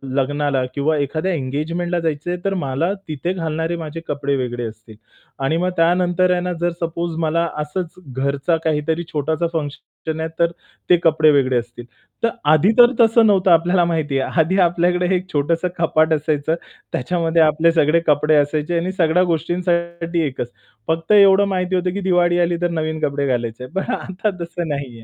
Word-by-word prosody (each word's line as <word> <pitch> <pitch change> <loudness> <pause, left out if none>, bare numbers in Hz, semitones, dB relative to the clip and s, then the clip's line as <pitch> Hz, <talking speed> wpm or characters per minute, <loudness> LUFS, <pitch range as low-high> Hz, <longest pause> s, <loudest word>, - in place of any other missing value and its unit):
लग्नाला 145 0 0
किंवा 150 +2 0
एखाद्या 155 +6 -1
एंगेजमेंटला 165 +5 -2
जायचं 160 0 -3
आहे, 180 - -3
तर 195 - +1
मला 140 +8 -1
तिथे 160 +4 -3
घालणारे 165 -1 -2
माझे 165 0 -6
कपडे 140 -1 -1
वेगळे 120 -2 -3
असतील 110 0 -13 0.5
आणि 155 +4 +1
मग 180 +2 0
त्यानंतर 180 +2 +2
आहे 180 - +1
ना, 180 0 -2
जर 175 0 +1
सपोज 170 0 -3
मला 165 +1 +1
असंच 165 +3 -4
घरचा 140 +5 -1
काहीतरी 160 +2 0
छोटाचा 155 +3 -1
फंक्शन 155 +1 -5
आहे, 160 - -2
तर 170 0 +3 0.4
ते 180 - +6
कपडे 155 -1 +4
वेगळे 130 -3 +2
असतील. 120 0 -10 0.4
तर 230 - +4 0.2
आधी 165 +7 +4
तर 240 0 +8
तसं 225 0 +5
नव्हतं 190 -3 +3
आपल्याला 175 +2 +4
माहिती 155 -5 -1
आहे. 150 - -2
आधी 175 +5 0
आपल्याकडे 180 +1 +2
एक 185 +1 -4
छोटंसं 165 +5 0
कपाट 160 -1 +2
असायचं, 155 0 0 0.4
त्याच्यामध्ये 165 +3 0
आपले 160 +2 +4
सगळे 160 0 +3
कपडे 150 +1 +3
असायचे. 150 +3 +1
आणि 175 +3 -1
सगळ्या 180 0 +2
गोष्टींसाठी 170 0 -1
एकच, 125 -3 -4 0.4
फक्त 165 +3 -1
एवढं 200 -1 +6
माहिती 185 -1 -1
होतं 180 0 0
की 200 - -3
दिवाळी 175 0 +3
आली, 170 0 +1
तर 175 - +1
नवीन 160 -1 -2
कपडे 140 0 -2
घालायचे. 120 -1 -2
पण 195 +6 -2
आता 190 +1 -3
तसं 170 0 -4
नाहीये. 135 -6 -5
165 Hz, 170 wpm, -20 LUFS, 145-175 Hz, 0.5 s, तर